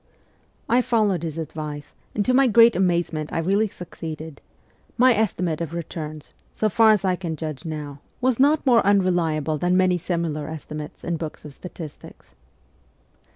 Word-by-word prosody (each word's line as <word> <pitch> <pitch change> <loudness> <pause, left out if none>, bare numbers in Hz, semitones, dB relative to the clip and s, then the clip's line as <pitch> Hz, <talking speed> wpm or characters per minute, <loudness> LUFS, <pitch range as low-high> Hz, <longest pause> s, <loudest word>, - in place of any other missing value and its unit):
I 245 +2 +4
followed 210 -8 +1
his 165 -2 -5
advice, 150 -2 -6 0.2
and 205 - 0
to 255 - +2
my 270 +1 +5
great 230 0 +6
amazement 170 -4 0
I - - -2
really 195 +6 +2
succeeded: 160 -5 -8 0.6
my 255 +1 +6
estimate 180 -7 -1
of 165 0 -4
returns, 155 -2 -6 0.2
so 215 - 0
far 225 +2 +5
as 210 -2 +3
I 185 -1 +2
can 170 -3 -4
judge 155 0 -6
now, 150 -3 -6 0.2
was 255 -1 +1
not 290 +3 +3
more 240 -3 +5
unreliable 170 -6 +1
than 180 +3 +2
many 185 -1 +3
similar 160 -4 -2
esti 155 -1 -8
mates 150 -1 -7
in 170 -1 -2
books 155 -1 -7
of 150 - -9
statistics. 165 -2 -11
170 Hz, 160 wpm, -23 LUFS, 155-205 Hz, 0.6 s, great